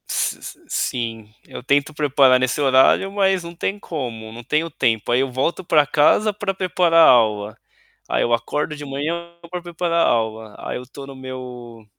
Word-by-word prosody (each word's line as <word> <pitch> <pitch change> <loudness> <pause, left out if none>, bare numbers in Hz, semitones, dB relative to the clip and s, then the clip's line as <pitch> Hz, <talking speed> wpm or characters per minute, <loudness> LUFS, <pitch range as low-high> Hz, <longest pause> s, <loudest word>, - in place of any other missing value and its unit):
S - - -1
s - - -10
sim, 115 -3 -3
eu - - -9
tento 140 +3 +1
preparar 140 -3 +4
nesse 130 +2 -1
horário, 135 +8 +4
mas 195 -2 +1
não 170 0 -9
tem 195 +4 -3
como, 120 - -6
não 120 +2 -10
tenho 155 +7 -1
tempo, 115 -7 -1
aí 120 - +3
eu 135 -1 -2
volto 135 +9 -1
para 155 -4 +3
casa 185 +9 +3
para 200 -1 -3
preparar 180 -3 +4
aula. 110 -3 +3 0.5
Aí - - +1
eu 120 - 0
acordo 150 +5 -2
de 145 0 -8
manhã 165 +5 -4 0.2
para 180 0 -5
preparar 170 -1 0
aula, 110 -2 -1
aí - - -5
eu 125 - -8
estou 135 +2 -11
no 135 - -10
meu 125 -3 -9
140 Hz, 180 wpm, -21 LUFS, 120-170 Hz, 0.5 s, preparar